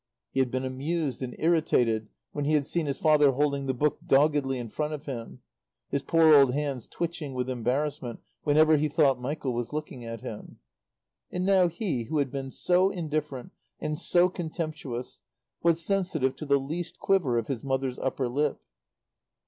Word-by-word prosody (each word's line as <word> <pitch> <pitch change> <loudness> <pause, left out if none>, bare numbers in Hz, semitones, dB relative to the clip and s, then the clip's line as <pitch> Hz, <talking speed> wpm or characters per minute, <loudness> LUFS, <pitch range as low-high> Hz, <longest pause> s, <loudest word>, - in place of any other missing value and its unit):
He - - -1
had 130 -2 +2
been 130 +1 -2
amused 140 +2 -2
and 125 -1 -4
irritated 125 -10 +2 0.2
when 145 -1 -3
he 155 - +1
had 150 -2 +3
seen 160 +1 -1
his 140 - -2
father 150 -3 +4
holding 140 0 0
the 130 - +1
book 150 +4 +1
doggedly 140 -1 +3
in 120 -1 -5
front 150 +6 -2
of 145 - -11
him, 120 -5 -7 0.5
his 140 - 0
poor 160 +1 +5
old 135 -3 +6
hands 140 -5 -2
twitching 165 -5 -4
with 125 0 -1
embarrassment 125 0 -2 0.2
whenever 155 +1 +5
he 150 +1 +1
thought 140 -4 +2
Michael 135 0 -2
was 120 -1 -3
looking 150 -4 -5
at 115 -1 -6
him. 105 - -8 0.7
And 180 0 -2
now 190 -2 +5
he, 170 - -2
who 155 +6 -2
had 140 -3 0
been 135 -1 -4
so 180 +5 +3
indifferent 150 -7 -3 0.3
and 150 0 -3
so 175 0 +4
contemptuous, 155 -8 -5 0.4
was 170 -1 +2
sensitive 175 -9 0
to 150 - -7
the 140 0 +4
least 160 +5 -5
quiver 175 -12 +2
of 115 - 0
his 130 -5 -3
mother's 135 -1 -1
upper 130 -1 -1
lip. 145 +4 0
145 Hz, 175 wpm, -28 LUFS, 130-155 Hz, 0.7 s, old